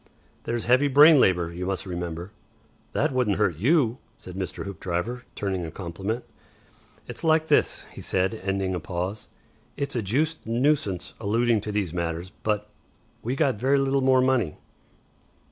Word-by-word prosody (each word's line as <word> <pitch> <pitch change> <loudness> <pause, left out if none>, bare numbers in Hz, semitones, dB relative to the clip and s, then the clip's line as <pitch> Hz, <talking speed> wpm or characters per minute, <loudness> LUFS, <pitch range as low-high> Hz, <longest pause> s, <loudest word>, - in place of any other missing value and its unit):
"There's 120 -1 -2
heavy 130 +4 +4
brain 145 +2 +8
labour, 90 -6 +2
you 90 +2 -4
must 95 0 -2
remember." 85 0 -5 0.6
"That - - +1
wouldn't 125 -7 +1
hurt 95 -7 +1
YOU," 125 - +3 0.2
said 90 - -10
Mr. 95 +1 -5
Hoopdriver, 100 +6 -3
turning 95 -3 -2
a 80 - -4
compliment. 95 +7 -4 0.8
"It's - - -7
like 160 0 +3
this," - - +2
he - - -9
said, 95 +2 0
ending 95 -2 -2
a 90 - -1
pause. 90 +5 -4 0.5
"It's 140 -1 -3
a 120 - +1
juiced 150 +11 0
nuisance 115 - 0
alluding 115 +1 +2
to 105 - -4
these 100 -5 -1
matters, 85 +1 -3
but 105 -1 -1 0.5
we 125 +4 -2
got 135 -5 +1
very 135 +4 +3
little 135 0 +2
more 130 -1 +4
money." 125 -11 +1
105 Hz, 155 wpm, -26 LUFS, 90-130 Hz, 0.8 s, brain